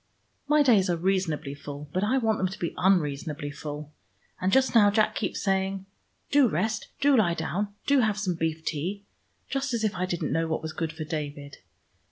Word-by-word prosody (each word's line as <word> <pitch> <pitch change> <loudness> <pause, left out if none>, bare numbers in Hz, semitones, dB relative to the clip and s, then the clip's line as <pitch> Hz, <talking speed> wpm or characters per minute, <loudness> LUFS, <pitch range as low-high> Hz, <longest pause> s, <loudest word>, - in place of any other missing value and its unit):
My 300 0 +5
days 210 -8 +4
are 175 - +1
reasonably 165 -5 0
full, 145 +1 -8
but 185 - 0
I 225 +6 +2
want 220 -4 +1
them 185 - +2
to 190 +3 -7
be 170 - -3
unreasonably 150 -5 0
full. 150 0 -7 0.5
And 185 +1 +1
just 265 +2 +3
now 210 -3 +7
Jack 215 +1 +2
keeps 215 - -3
saying, 195 0 0 0.5
'Do 285 -2 +6
rest: 215 +4 -1
do 285 -1 +5
lie 180 -8 +3
down: 200 +6 -3
do 280 -1 +4
have 215 -4 +2
some 200 -4 0
beef 160 -1 -2
tea.' 185 +7 -3 0.4
Just 270 -2 -1
as 225 - -2
if 215 - +1
I 185 0 -2
didn't 175 -2 -2
know 165 0 +1
what 160 0 -2
was 160 0 -4
good 160 -1 -2
for 160 0 -6
David! 145 -2 -5
185 Hz, 200 wpm, -27 LUFS, 160-215 Hz, 0.5 s, now